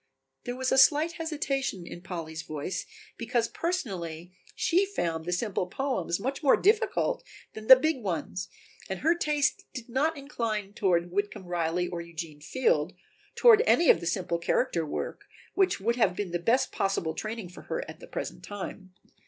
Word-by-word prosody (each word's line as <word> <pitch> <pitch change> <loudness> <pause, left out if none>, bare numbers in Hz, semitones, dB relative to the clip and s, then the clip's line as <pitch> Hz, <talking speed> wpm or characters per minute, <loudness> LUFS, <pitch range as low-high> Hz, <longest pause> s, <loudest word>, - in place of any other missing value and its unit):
There 245 -1 -3
was 260 0 -1
a 265 - +5
slight 305 +4 +5
hesitation 280 - -2
in 175 - -9
Polly's 165 -3 -5
voice 155 +4 -4 0.3
because 235 0 0
personally 180 - -4 0.2
she 360 +3 +3
found 170 - -2
the 175 - -2
simple 185 0 -1
poems 190 -6 -1
much 265 +6 -3
more 280 -4 +5
difficult 460 +4 +2 0.3
than 220 0 -9
the 260 - +12
big 290 0 0
ones 185 -1 -3 0.4
and 190 -1 -4
her 325 +4 +4
taste 300 -4 +1
did 245 -3 -6
not 290 +6 +1
incline 225 -8 -3
toward 175 -5 +1
Whitcomb 200 0 -2
Riley, 175 0 -1
or 175 -1 -4
Eugene 165 -3 -8
Field, 175 - +1 0.4
toward 460 -3 +7
any 340 - +6
of - - +2
the 170 - -5
simple 175 -1 -1
character 170 -2 0
work, - - -4 0.3
which 385 -2 +2
would 235 +5 0
have 220 -6 +3
been 200 -3 -3
the 175 - -1
best 230 +9 +2
possible 195 -5 -1
training 215 0 -5
for 180 - -12
her - - -2
at - - -10
the - - -12
present - - -5
time. 190 -2 -7
205 Hz, 170 wpm, -28 LUFS, 175-270 Hz, 0.4 s, the